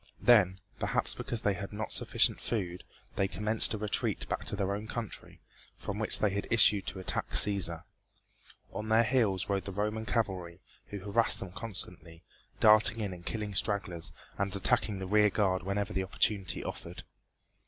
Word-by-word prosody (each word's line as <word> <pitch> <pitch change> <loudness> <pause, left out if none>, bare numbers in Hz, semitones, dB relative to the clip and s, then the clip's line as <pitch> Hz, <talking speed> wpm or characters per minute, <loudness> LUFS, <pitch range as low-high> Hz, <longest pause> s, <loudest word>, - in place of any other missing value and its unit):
Then, 95 -6 +5 0.2
perhaps - - 0
because 115 - -4
they 100 - +1
had 95 +1 -7
not 105 +1 -5
sufficient - - +1
food, 90 -6 -3 0.3
they 100 - +2
commenced 105 +4 0
a - - -4
retreat 105 -1 -2
back - - -3
to - - +1
their 100 -1 -1
own 105 +2 -5
country, 115 -2 -6 0.4
from 100 +1 -5
which 110 - +6
they 105 - +1
had 100 +1 -3
issued 105 -4 +3
to 95 - -4
attack 95 - -1
Cæsar. 85 -5 +2 0.9
On 110 +1 -5
their 110 +1 +5
heels 110 -6 +1
rode 100 -2 -1
the 100 - -5
Roman 105 +3 -3
cavalry, 95 -6 -2 0.3
who 100 -2 -7
harassed 105 +4 +2
them 95 - -7
constantly, 90 -4 -6 0.4
darting 110 +1 +7
in 100 -4 -3
and 85 -1 -11
killing 105 +1 -4
stragglers 95 -4 -2 0.3
and 100 0 +1
attacking 105 0 +3
the 95 - -5
rear 105 +2 +4
guard 95 -3 0
whenever 100 +2 -3
the 95 - -1
opportunity 95 +1 0
offered. - - -7
100 Hz, 170 wpm, -30 LUFS, 95-110 Hz, 0.9 s, darting